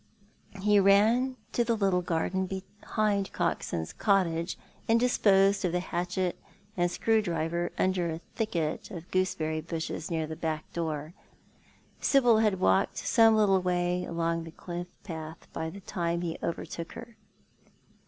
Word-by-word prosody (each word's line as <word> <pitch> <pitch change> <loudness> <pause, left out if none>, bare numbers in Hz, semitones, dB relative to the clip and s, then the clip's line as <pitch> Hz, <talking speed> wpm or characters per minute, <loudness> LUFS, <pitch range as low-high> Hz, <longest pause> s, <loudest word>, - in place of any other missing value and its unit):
He 210 0 +5
ran 220 +7 +4
to 240 - +2
the 230 -1 0
little 195 -3 +2
garden, 180 +2 -1
behind 200 +1 -2
Coxon's 80 -1 -2
cottage, 180 -4 +1 0.3
and 225 +1 +4
disposed 200 -5 +4
of 180 -2 0
the 180 - +2
hatchet 180 0 -2 0.4
and 175 -1 +2
screw 220 +5 +2
driver 170 -2 -1
under 185 -2 +1
a 160 - -3 0.2
thicket 170 -9 -2
of 170 -2 -9
gooseberry 160 -4 0
bushes 160 0 -4
near 160 -2 -1
the 160 +1 -6
back 155 -1 -4
door. 155 -1 -3 0.9
Sibyl 245 -5 +4
had 210 -4 +2
walked 95 0 +2
some 225 -1 +5
little 195 -3 +4
way 180 0 0
along 165 0 -1
the 165 - -8
cliff 175 +1 -6 0.2
path 160 -4 -7
by 160 0 -3
the 200 +4 -10
time 170 -3 -2
he 170 -2 -2
overtook 170 0 -4
her. 235 -1 -10
180 Hz, 145 wpm, -29 LUFS, 165-200 Hz, 0.9 s, He